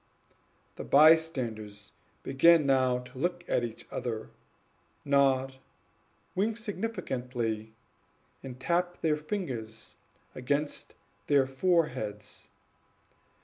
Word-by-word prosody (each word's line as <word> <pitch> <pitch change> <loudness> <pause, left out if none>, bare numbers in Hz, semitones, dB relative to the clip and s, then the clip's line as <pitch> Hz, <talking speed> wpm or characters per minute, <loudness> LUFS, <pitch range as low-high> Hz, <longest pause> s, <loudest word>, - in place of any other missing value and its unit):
The - - -5
bystanders 130 -10 +3 0.3
began 155 +3 +5
now 130 -2 +3
to 125 +1 -10
look 175 +3 -1
at 120 - +1
each 115 -2 -6
other, 115 -3 -4 0.7
nod, 135 -1 +2 0.8
wink 210 +4 0
significantly, 125 - -3 0.7
and 130 -1 -9
tap 175 +5 -1
their 155 -2 +2
fingers 130 - -5 0.4
against 140 +4 -2 0.3
their 140 -2 +4
foreheads. 130 - -1
135 Hz, 85 wpm, -29 LUFS, 120-165 Hz, 0.8 s, began